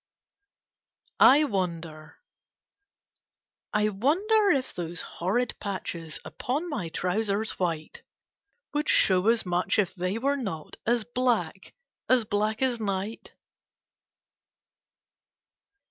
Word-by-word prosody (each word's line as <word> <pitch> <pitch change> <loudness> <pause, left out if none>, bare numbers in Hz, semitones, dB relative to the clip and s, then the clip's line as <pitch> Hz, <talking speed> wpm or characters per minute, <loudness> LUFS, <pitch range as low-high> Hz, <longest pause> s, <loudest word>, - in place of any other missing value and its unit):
I 290 +4 +8
WONDEE 170 - -3 1.6
I 210 -1 +2
wonder 380 - +2
if 270 -7 +1
those 170 -1 -4
horrid 215 +9 -1
patches 170 -5 -5
Upon 290 +8 -3
my 205 - -3
trousers 200 +5 -1
white 165 -4 -2 0.7
Would 295 0 -1
show 185 +1 +4
as 230 -1 +3
much 180 0 +1
if 195 -4 +1
they 185 +2 -2
were 280 +4 +1
not 180 - -5
As 235 -1 +2
black 245 +1 -1 0.3
a» 255 -3 +4
black 215 +3 0
as 250 -3 +1
night 200 +1 -4
210 Hz, 100 wpm, -27 LUFS, 180-250 Hz, 1.6 s, I